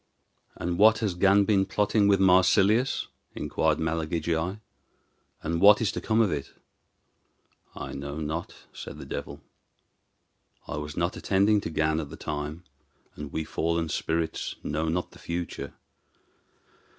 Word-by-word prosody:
"And 85 +1 -3
what 110 +1 +7
has 110 -4 -1
Gan 100 +3 +4
been 100 -2 +3
plotting 105 +1 +2
with 100 -1 +4
Marsilius?" 95 +6 +4 0.3
inquired 80 -1 0
Malagigi; 80 +3 -1 0.8
"and 85 +1 -1
what 105 +1 +8
is 115 - +1
to - - -5
come 110 +1 +2
of 105 -5 +2
it?" 70 -2 -4 1.2
"I - - -6
know 70 +2 -5
not," 80 +2 -4 0.2
said - - -8
the - - -9
devil. - - -6 1.3
"I - - -4
was 75 0 -6
not 85 +2 0
attending 100 +2 +2
to - - -4
Gan 80 0 +1
at 75 -3 -5
the 80 - -9
time, 75 +2 -5 0.5
and 75 -1 -7
we 80 - -2
fallen 85 +1 -1
spirits 80 +1 -2
know 75 +2 -2
not 90 +2 -2
the - - -16
future. 85 0 -5
85 Hz, 140 wpm, -27 LUFS, 80-100 Hz, 1.3 s, what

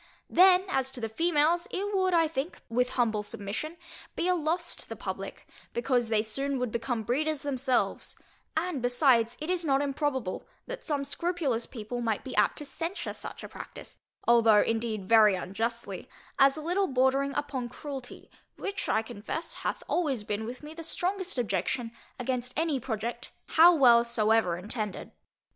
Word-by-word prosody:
Then 370 +1 +6
as 265 -7 0
to 260 - -3
the 225 - -2
females, 330 +5 +2
it 405 +2 -2
would, 375 -1 +2
I 330 -1 +4
think, 300 +2 -4
with 250 +2 +1
humble 225 -4 +1
submission, 210 +11 -5 0.4
be 345 - 0
a 365 - +4
loss 340 +1 0
to - - -1
the - - -5
publick, - - -6 0.3
because 240 0 +1
they 215 -1 +2
soon 275 +5 -2
would 250 -3 -2
become 235 0 -2
breeders 300 +6 0
themselves: 265 -3 0 0.4
and 325 -4 -1
besides, 245 -2 +3
it 310 - -5
is 360 -1 0
not 275 -3 +3
improbable 275 -7 -2 0.2
that - - -7
some 290 -3 -1
scrupulous 295 -7 -1
people 240 0 -5
might 225 -3 -1
be 265 - -6
apt 210 - +3
to 295 - -5
censure 330 +7 -4
such - - -8
a - - -5
practice, - - -10 0.3
(although 230 -3 +6
indeed 225 -4 -2
very 215 -3 +6
unjustly) 225 +6 -4 0.3
as 275 +1 +6
a - - -4
little 370 +4 +1
bordering 265 +1 +2
upon 260 -4 -2
cruelty, 270 -1 -8 0.2
which, 400 0 -4
I 220 - +2
confess, 220 +10 -5
hath - - -3
always 280 -10 0
been 210 +1 -3
with 250 +5 -7
me 300 +1 -8
the 330 - -8
strongest 365 +2 -2
objection 240 0 -1 0.3
against 250 0 -3
any 315 -4 +1
project, 230 -1 -4 0.2
how 340 +2 +7
well 240 -5 +7
soever 220 -6 +2
intended. 210 +2 -4
260 Hz, 165 wpm, -29 LUFS, 230-315 Hz, 0.4 s, how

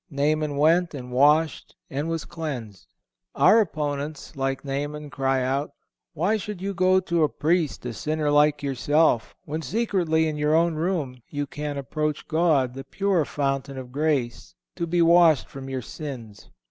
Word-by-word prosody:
Naaman 150 0 0
went 165 +2 +3
and 125 -2 -8
washed 150 +4 +2
and 145 +4 -3
was 165 -1 -3
cleansed. 125 - -6 0.5
Our 225 - +6
opponents, 150 -6 -3
like 135 0 -2
Naaman, 145 +2 -4
cry 135 -1 0
out: 135 +3 -1 0.4
"Why 180 +8 +1
should 210 -2 -6
you 195 +2 -3
go 185 0 +3
to 170 -2 0
a 150 - +4
Priest, 160 -4 0
a 120 - -3
sinner 155 +4 -1
like 145 0 +3
yourself, 140 -1 +1
when 155 +2 -4
secretly, 175 -6 +1
in 155 -1 -3
your 150 +1 +2
own 170 +1 +3
room, 155 -6 -2
you 145 -1 -3
can 145 +1 -5
approach 150 +3 -3
God, 155 -6 +2
the 135 +1 -7
pure 195 -1 0
fountain 135 -1 -2
of 125 -1 -8
grace, 140 -4 -1 0.2
to 170 -2 -3
be 170 +1 +2
washed 165 -3 +5
from 135 -1 -9
your 130 -2 -4
sins?" 120 -9 -8
150 Hz, 160 wpm, -25 LUFS, 135-165 Hz, 0.5 s, Our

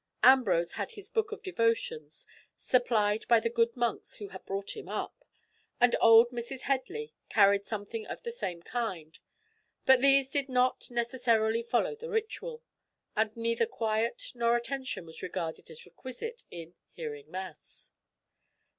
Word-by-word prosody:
Ambrose 235 -10 +5
had - - -4
his 410 +1 -12
book 445 -2 0
of 435 - -7
devotions, 230 - -1 0.3
supplied 220 -4 +2
by 235 -1 +6
the 230 +1 -1
good 235 +1 +1
monks 240 -2 -1
who 205 -2 -8
had 190 - -10
brought 195 +1 -4
him 430 - -9
up, - - -5 0.6
and 245 0 +5
old 230 +1 +8
Mrs. 245 +2 -5
Headley 275 - -2 0.2
carried 200 -1 +4
something 215 +1 -5
of - - -7
the 470 - -4
same 175 - -4
kind; 180 -11 -4 0.7
but 265 -1 +6
these 275 -1 +5
did 280 -1 0
not 255 0 +1
necessarily 235 -2 +1
follow 240 - 0
the 470 +2 -8
ritual, 465 +2 -3 0.5
and 220 0 0
neither 230 0 +1
quiet 230 - -1
nor 235 0 +2
attention 260 -5 -4
was 160 0 -10
regarded 165 -2 -4
as 160 -1 -9
requisite 260 - -7
in 170 0 -9 0.2
"hearing 150 -3 -7
mass." 185 +2 -9
235 Hz, 145 wpm, -30 LUFS, 205-265 Hz, 0.7 s, old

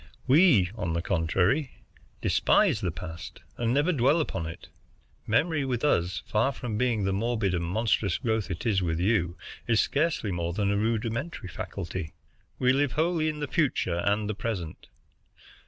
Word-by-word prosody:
We, 130 - +5
on 90 -7 -3
the 85 - -1
contrary, 90 - +1 0.5
despise - - +3
the 90 - 0
past, 80 -1 -8
and 120 -1 -1
never 145 +7 +2
dwell 140 +2 +3
upon 85 - -2
it. 85 +2 -9 0.6
Memory 150 +7 +2
with 125 -2 -2
us, 85 - +1
far 115 +6 +1
from 120 -5 -5
being 115 -2 +1
the 95 0 0
morbid 110 -2 0
and 85 -1 -1
monstrous 100 +1 0
growth 110 -4 -1
it 85 -2 -5
is 100 -5 +2
with 80 -2 -1
you, 90 -3 +1 0.3
is 115 -2 +3
scarcely 145 -8 +1
more 85 -1 -2
than 100 +1 0
a - - +1
rudimentary 115 - -2
faculty. 90 -3 -5 0.4
We 130 0 +3
live 140 -1 +1
wholly 160 0 +1
in 150 -1 -5
the 145 - -2
future 130 - 0
and 105 +1 +1
the 110 - -1
present. 100 -6 -5
110 Hz, 165 wpm, -27 LUFS, 90-130 Hz, 0.6 s, We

